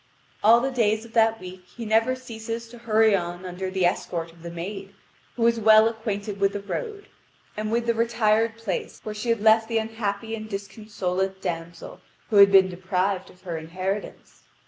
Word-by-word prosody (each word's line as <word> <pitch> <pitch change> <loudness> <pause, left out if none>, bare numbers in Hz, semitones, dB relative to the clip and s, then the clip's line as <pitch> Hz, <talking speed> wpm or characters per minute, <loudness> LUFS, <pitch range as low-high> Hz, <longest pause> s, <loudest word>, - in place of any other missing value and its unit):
All 230 +2 +7
the 270 +2 -1
days 220 -3 +1
of 225 - -15
that 225 -1 +3
week 185 0 -10
he 235 - -5
never 225 +4 +2
ceases 230 -2 -6
to 240 0 -12
hurry 220 -2 +3
on 175 0 -4
under 185 +1 -4
the 185 -1 0
escort 170 -1 -1
of 165 0 -20
the 170 - -7
maid, 195 +3 -7 0.4
who 235 - -1
was 235 0 +3
well 220 0 +6
acquainted 210 -3 -4
with 195 0 +2
the 205 - -3
road, 410 - -5 0.5
and 215 0 -3
with 235 +1 0
the 235 - +2
retired 225 -1 +1
place 220 -6 -4
where 215 - -5
she 215 +3 -4
had 230 -2 +1
left 220 +1 +5
the 230 -1 0
unhappy 225 -1 -3
and 215 -1 -6
disconsolate 195 -2 -3
damsel 170 -2 -6 0.3
who 210 - +3
had 200 0 +8
been 190 -1 +7
deprived 185 +1 -2
of 180 - -20
her 170 -4 -4
inheritance. 185 +5 -5
210 Hz, 190 wpm, -25 LUFS, 190-225 Hz, 0.5 s, had